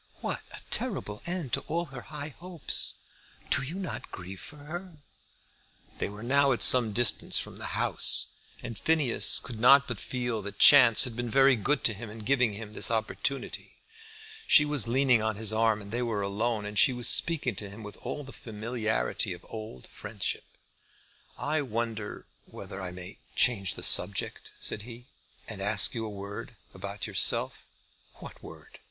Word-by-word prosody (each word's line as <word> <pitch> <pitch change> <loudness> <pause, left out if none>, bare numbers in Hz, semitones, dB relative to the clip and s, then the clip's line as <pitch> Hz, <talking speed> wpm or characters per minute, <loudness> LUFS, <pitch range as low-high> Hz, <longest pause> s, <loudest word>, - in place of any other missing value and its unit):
What - - -4
a - - -10
terrible 105 0 -3
end 175 -8 -4
to - - +2
all 170 +3 -2
her 125 - -7
high 150 +1 -8
hopes! 175 -3 -1 0.6
Do - - +4
you 140 +6 -6
not 190 -1 -6
grieve 95 +1 -9
for 150 - -9
her?" 175 +5 -8 1.1
They - - -2
were 105 +2 -10
now 140 +2 +3
at 120 - -1
some 120 -4 +5
distance 120 +1 +2
from - - -3
the - - -5
house, - - +4 0.3
and 115 -4 -7
Phineas 150 -5 +2
could 115 -2 -6
not 140 +4 +6
but 120 -5 -5
feel 120 -3 -3
that 100 0 -8
chance 125 -6 +8
had 125 -3 -3
been 120 0 -4
very 135 +2 +5
good 135 +7 -1
to 115 - +2
him 105 +2 -9
in 110 0 -10
giving 125 -3 +2
him 105 0 -8
his - - +3
opportunity. 115 +4 -3 0.7
She 150 - +6
was 145 -7 +2
leaning 125 -1 +3
on 110 0 -1
his 110 +1 +1
arm, 110 -1 +1
and 100 - -11
they 120 +2 -2
were 110 -4 -2
alone, 105 +2 -2
and 105 -1 -2
she 130 - +5
was 120 -1 +1
speaking 155 -7 +4
to 105 -1 -5
him 105 +3 -11
with 105 0 -10
all 130 +4 -6
the 135 - -12
familiarity 110 -2 -3
of 90 - -13
old 110 - -8
friendship. 105 -3 -5 0.9
"I 150 +1 -1
wonder 115 -4 -4 0.2
whether 95 - -9
I 95 - -5
may 90 +2 -10 0.2
change 100 -6 +3
the - - -7
subject," 95 +1 +2
said 105 - -3
he, 120 +2 -11 0.4
"and 105 -3 -8
ask 100 -1 +2
you 115 -2 -4
a - - -6
word 100 +3 -8 0.2
about 100 +2 -7
yourself?" - - -2 0.5
"What - - -12
word?" - - -13
115 Hz, 175 wpm, -28 LUFS, 105-135 Hz, 1.1 s, chance